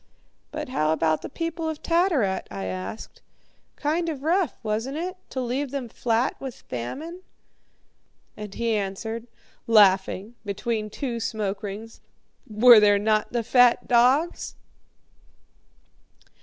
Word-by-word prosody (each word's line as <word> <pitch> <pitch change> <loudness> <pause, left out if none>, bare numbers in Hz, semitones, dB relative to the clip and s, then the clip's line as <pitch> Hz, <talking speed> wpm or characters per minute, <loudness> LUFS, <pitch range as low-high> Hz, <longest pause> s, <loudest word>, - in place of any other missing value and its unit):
"But - - -5
how 155 -10 +1
about 160 -1 +1
the - - -7
people 330 +1 -3
of 310 -1 -6
Tattarat?" 330 - +1
I 100 -1 -5
asked. 95 +3 -6 0.5
"Kind 330 +3 -1
of 285 -4 -5
rough, 345 +2 +1
wasn't 225 +6 -2
it, 360 +3 -3
to 260 - -4
leave 260 +3 -2
them 270 -2 -4
flat 235 +2 0
with 265 -3 -6
famine?" 295 - -6 1.1
And 210 -2 -8
he 235 -1 0
answered, 220 +4 -4 0.4
laughing, 200 -1 +4
between 215 +1 -3
two 235 +1 -4
smoke 210 -3 -3
rings, 215 +2 -7 0.5
"Were 225 +2 +8
there 205 -1 +5
not 215 +1 +1
the 235 -1 -1
fat 245 +1 +4
dogs?" 255 +8 +2
230 Hz, 125 wpm, -25 LUFS, 205-275 Hz, 1.1 s, Were